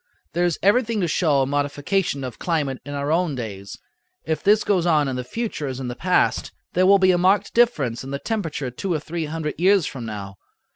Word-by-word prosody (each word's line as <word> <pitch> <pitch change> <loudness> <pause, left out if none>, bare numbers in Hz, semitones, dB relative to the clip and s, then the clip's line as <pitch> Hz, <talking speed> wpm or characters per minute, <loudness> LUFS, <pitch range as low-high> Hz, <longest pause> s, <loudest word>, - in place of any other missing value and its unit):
There 175 +1 +1
is 175 -3 0
everything 225 +2 +3
to 175 - +1
show 150 -4 +2
a - - 0
modification 145 +3 -1
of 125 -3 -6
climate 145 -6 -1
in 145 +1 -6
our 140 +1 -2
own 165 -3 +1
days. 100 -5 -7 0.5
If 160 - -1
this 210 +2 +4
goes 180 -4 +1
on 150 -4 +3
in 130 - -2
the 125 - -3
future 155 - -4
as 130 -1 -5
in 130 -2 -4
the 120 - -5
past, 180 +7 +1 0.2
there 185 +1 +3
will 200 +1 +7
be 185 -1 +4
a 175 - +2
marked 195 +2 +2
difference 145 - +2
in 135 - -8
the 140 - -2
temperature 160 - -3
two 185 +10 -4
or 160 - +1
three 160 +2 -4
hundred 155 0 -4
years 190 -1 +4
from 120 -4 -6
now. 100 -2 -7
155 Hz, 225 wpm, -23 LUFS, 135-185 Hz, 0.5 s, will